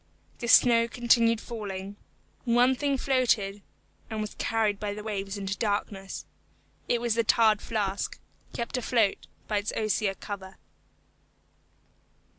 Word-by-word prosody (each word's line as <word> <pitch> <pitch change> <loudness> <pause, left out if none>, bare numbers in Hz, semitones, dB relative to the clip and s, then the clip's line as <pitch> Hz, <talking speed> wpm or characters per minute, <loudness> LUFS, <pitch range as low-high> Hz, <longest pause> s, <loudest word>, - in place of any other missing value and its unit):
The 235 - -4
snow 230 0 +6
continued 230 -1 +3
falling. 200 -4 -6 0.5
One 245 +1 +4
thing 280 +1 0
floated, 235 -7 +1 0.5
and 220 - -4
was 215 -1 -4
carried 220 -3 +1
by 205 -1 -3
the 210 - -7
waves 200 -2 -4
into 195 -1 -3
the - - -9
darkness. 205 -2 -2 0.6
It 240 - +2
was 235 -1 0
the 230 +1 +2
tarred 220 -1 +4
flask, 205 -3 -2 0.3
kept 235 +2 -3
afloat 230 -4 +1 0.2
by 210 -1 +1
its 205 - -3
osier 215 -2 0
cover. 190 -2 -8
215 Hz, 130 wpm, -28 LUFS, 200-235 Hz, 0.6 s, snow